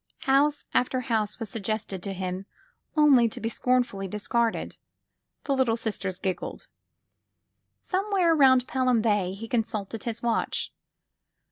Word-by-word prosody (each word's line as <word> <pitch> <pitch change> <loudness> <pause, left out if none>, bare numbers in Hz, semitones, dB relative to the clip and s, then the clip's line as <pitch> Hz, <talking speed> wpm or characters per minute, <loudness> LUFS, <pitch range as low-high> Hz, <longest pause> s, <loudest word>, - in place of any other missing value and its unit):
House 285 +2 +2
after 255 +1 +1
house 220 -4 -1
was 225 - -4
suggested 215 -3 -3
to 200 - -4
him 185 +1 -4 0.5
only 270 -6 +6
to - - -8
be 225 - -2
scornfully 245 -6 0
discarded. 225 +4 -1 0.7
The 275 - 0
Little 245 -4 +2
Sisters 200 -5 -3
girled. 190 -1 -4 1.2
Somewhere 380 -3 +1
round 260 -4 +5
Pelham 255 -4 +2
Bay 205 -5 +1
he 220 +4 -7
consulted 220 -2 -2
his 235 0 -4
watch. 235 -1 -1
230 Hz, 125 wpm, -27 LUFS, 205-260 Hz, 1.2 s, only